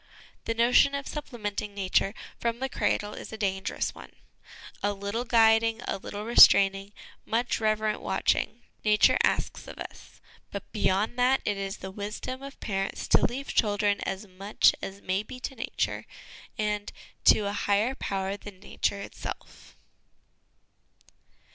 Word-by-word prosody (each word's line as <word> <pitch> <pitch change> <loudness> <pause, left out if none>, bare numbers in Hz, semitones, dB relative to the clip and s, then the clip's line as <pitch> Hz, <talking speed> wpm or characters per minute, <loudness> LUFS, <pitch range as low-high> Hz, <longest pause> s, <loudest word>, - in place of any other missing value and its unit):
The 230 - -1
notion 245 +4 +4
of 280 0 -4
supple 290 -4 -6
menting 205 -1 -4
Nature 195 +1 +1 0.2
from 235 0 -1
the 265 +2 -3
cradle 210 -4 -1
is - - -8
a 220 - -6
dangerous 195 -2 -2
one. - - -12 0.7
A 205 0 +1
little 200 +4 -3
guiding, 225 -1 +4
a - - -2
little 205 +2 -6
restraining, 195 -4 +6 0.3
much 235 +2 0
reverent 215 -1 0
watching, - - 0 0.2
Nature 210 -1 +4
asks - - 0
of - - -9
us; - - -10 0.3
but - - -7
beyond 210 +6 0
that, 255 +2 +4
it 205 - +1
is 195 0 -4
the 190 - -7
wisdom 210 +6 -5
of 275 0 -10
parents 195 -2 -3
to - - +5
leave 270 +3 -1
children 205 -2 +2
as 195 +2 -4
much 195 +2 +2
as 195 +1 -7
may 190 +2 0
be 250 +4 -10
to 270 - -4
Nature, 230 - -3 0.5
and 210 -1 -2 0.2
" - - -33
to - - +7
a 200 0 -2
higher 205 +4 +1
Power 195 -6 -3
than 205 -2 -11
Nature 200 0 -2
itself." - - -9
210 Hz, 150 wpm, -28 LUFS, 200-230 Hz, 0.7 s, to